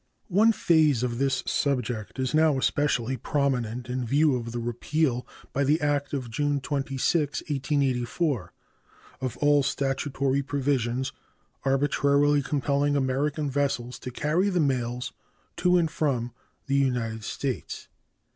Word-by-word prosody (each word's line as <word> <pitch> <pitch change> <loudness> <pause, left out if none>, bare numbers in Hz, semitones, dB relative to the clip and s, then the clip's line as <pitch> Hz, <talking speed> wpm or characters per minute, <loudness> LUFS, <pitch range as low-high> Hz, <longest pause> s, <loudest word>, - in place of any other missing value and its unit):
One 210 +5 +5
phase 155 - +3
of 120 -1 -2
this 135 -1 +1
subject 125 -6 -1
is 130 +1 -1
now 155 -2 +4
especially 130 -2 0
prominent 125 -3 -1
in 125 +1 -2
view 140 +4 +3
of 115 -2 -4
the 120 - -4
repeal 120 +3 -1 0.3
by 140 - +1
the 150 +4 +3
act 145 -2 0
of 130 -5 -4
June 145 +4 0
26, 140 +2 -1
1884, 140 - 0 0.7
of 130 -2 -3
all 145 0 +4
statutory 140 0 0
provisions 130 -2 -1 0.5
arbitrarily 140 +1 +3
compelling 140 +1 0
American 140 +3 0
vessels 135 -3 -1
to 125 - -6
carry 155 +10 +1
the 180 -2 0
mails 125 -4 -1 0.4
to 180 0 +4
and 165 -3 +1
from 125 -7 -1 0.3
the 140 0 +1
United 120 -5 0
States. 130 +3 -4
140 Hz, 125 wpm, -26 LUFS, 125-145 Hz, 0.7 s, One